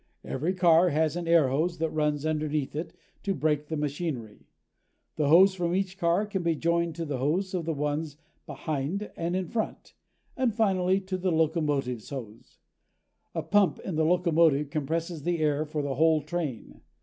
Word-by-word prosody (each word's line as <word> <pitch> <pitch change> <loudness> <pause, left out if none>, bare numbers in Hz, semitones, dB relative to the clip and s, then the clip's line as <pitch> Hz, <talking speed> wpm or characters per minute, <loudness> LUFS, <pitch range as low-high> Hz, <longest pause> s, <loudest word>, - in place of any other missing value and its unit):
Every 160 +8 -2
car 175 -1 +5
has 155 +1 +1
an 175 -1 -4
air 165 -5 +5
hose 165 +6 0
that 160 0 -1
runs 150 -1 0
underneath 155 -2 -1
it 160 +3 -4 0.3
to 200 - -1
the - - -7
brake 150 0 0
machinery. 145 -7 -4 0.7
The 150 - +1
hose 185 +6 +7
from 175 -1 -1
each 195 0 -2
car 175 +3 +2
can 200 -3 -3
be 170 -1 +1
joined 170 0 0
to 165 0 -4
the 145 -4 -3
hose 175 +9 0
on 175 -3 -2
the 165 - -1
ones 150 +1 -2 0.3
behind 155 +7 -3
and 170 +1 -2
in 185 -1 -1
front, 220 +5 -4 0.4
and 250 -5 0
finally 190 -4 +2
to 190 -1 -4
the 185 0 0
locomotive's 150 -7 0
hose. 115 -6 -9 0.8
A - - -1
pump 195 -2 +3
in 185 - -5
the 160 0 +1
locomotive 160 -4 +3
compresses 160 +2 -2
the 175 +3 0
air 155 -1 +1
for 150 -1 -3
the 140 -1 -2
whole 155 +2 +3
train. 155 -7 -5
160 Hz, 175 wpm, -28 LUFS, 150-175 Hz, 0.8 s, hose